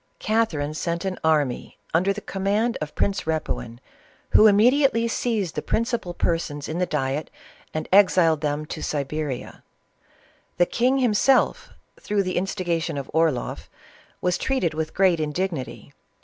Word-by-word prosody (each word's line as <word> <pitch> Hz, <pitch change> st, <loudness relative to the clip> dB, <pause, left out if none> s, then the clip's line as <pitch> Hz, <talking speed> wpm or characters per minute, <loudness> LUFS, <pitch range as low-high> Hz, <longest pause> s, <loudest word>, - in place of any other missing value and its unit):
Catherine 175 Hz, -10 st, 0 dB
sent 170 Hz, +3 st, -3 dB
an 190 Hz, -1 st, -3 dB
army 150 Hz, -5 st, 0 dB, 0.2 s
under 180 Hz, +5 st, +3 dB
the 205 Hz, +1 st, -4 dB
command 205 Hz, +5 st, -1 dB
of 155 Hz, -1 st, -5 dB
Prince 200 Hz, -1 st, 0 dB
Repuin, 155 Hz, -7 st, -3 dB, 0.5 s
Who 220 Hz, -, +7 dB
immediately 235 Hz, +3 st, +4 dB
seized 220 Hz, -7 st, -1 dB
the -, -, -3 dB
principal 230 Hz, -6 st, -2 dB
persons 150 Hz, -4 st, -2 dB
in 160 Hz, +3 st, -3 dB
the 180 Hz, -, +1 dB
diet, 140 Hz, 0 st, -2 dB, 0.4 s
and 155 Hz, 0 st, -4 dB
exiled 180 Hz, -6 st, +5 dB
them 150 Hz, 0 st, -1 dB
to -, -, -7 dB
Siberia. 145 Hz, -2 st, -4 dB, 1.0 s
The 175 Hz, -, +5 dB
king 250 Hz, +8 st, +1 dB
himself, 250 Hz, +1 st, +2 dB, 0.3 s
through 205 Hz, -1 st, 0 dB
the 185 Hz, -1 st, -2 dB
instigation 175 Hz, -4 st, -1 dB
of 140 Hz, -, -6 dB
Orloff, 160 Hz, -6 st, 0 dB, 0.5 s
was 180 Hz, -1 st, 0 dB
treated 260 Hz, -12 st, 0 dB
with 160 Hz, 0 st, -4 dB
great 185 Hz, -3 st, +3 dB
indig 155 Hz, +5 st, -1 dB
nity. 125 Hz, -5 st, -7 dB
175 Hz, 140 wpm, -24 LUFS, 155-205 Hz, 1.0 s, Who